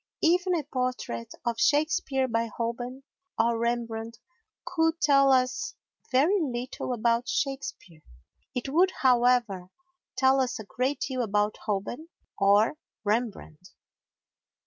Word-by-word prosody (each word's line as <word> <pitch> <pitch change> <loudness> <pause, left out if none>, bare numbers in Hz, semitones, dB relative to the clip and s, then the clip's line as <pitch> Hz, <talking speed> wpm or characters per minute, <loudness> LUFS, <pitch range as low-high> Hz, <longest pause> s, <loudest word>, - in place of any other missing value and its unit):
Even 360 +2 +3
a 320 - -1
portrait 250 - -3
of 235 -1 -1
Shakespeare 290 -3 +2
by 230 -1 0
Holbein 240 +4 -4 0.3
or 235 0 +2
Rembrandt 230 -1 -2 0.5
could 325 -1 +1
tell 275 -3 +5
us 255 -9 +1 0.4
very 310 +11 +4
little 255 -3 -3
about 235 +1 +1
Shakespeare. 265 - -3 0.5
It 250 +2 -2
would, 345 +7 +4
however, 240 -7 +3 0.5
tell 265 +1 +4
us 255 -2 -1
a 220 - -8
great 255 +7 -2
deal 255 -2 -1
about 210 -1 0
Holbein 220 +9 -3 0.3
or 205 +8 +4 0.2
Rembrandt. 205 -6 -3
245 Hz, 115 wpm, -27 LUFS, 225-275 Hz, 0.5 s, tell